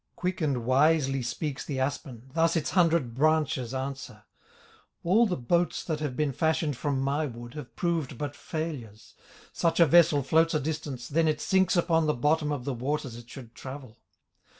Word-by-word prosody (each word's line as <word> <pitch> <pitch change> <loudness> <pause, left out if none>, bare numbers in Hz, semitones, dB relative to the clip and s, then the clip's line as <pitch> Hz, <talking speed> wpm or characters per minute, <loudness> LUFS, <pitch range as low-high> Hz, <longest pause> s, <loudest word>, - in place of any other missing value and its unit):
Quick 180 0 -3
and 135 -6 0
wisely 135 +1 +3
speaks 135 +3 -3
the 135 -3 -4
aspen, 130 -2 -4
Thus 165 +1 +2
its 160 - -1
hundred 165 -9 +2
branches 150 -2 +1
answer: 130 -5 -5 0.8
"All 215 +7 +4
the 180 - -2
boats 170 +8 0
that 155 -3 -3
have 145 -4 -4
been 150 -2 +1
fashioned 160 -1 0
From 140 +1 -1
my 140 +3 0
wood 120 -1 -9
have 150 -5 -9
proved 165 -7 -1
but 145 +1 -4
failures; 120 -10 -6 0.4
Such 165 0 0
a 170 - +8
vessel 155 -2 +5
floats 160 +4 +3
a - - +3
distance, 145 -4 -4
Then 160 +2 +2
it 155 -1 +1
sinks 190 +3 +2
upon 165 -2 +2
the 150 - +1
bottom 150 +4 +1
Of 135 -4 -3
the 140 - -1
waters 130 0 -3
it 120 0 -12
should 120 -4 -11
travel. 130 -3 -9
145 Hz, 175 wpm, -28 LUFS, 130-160 Hz, 0.8 s, a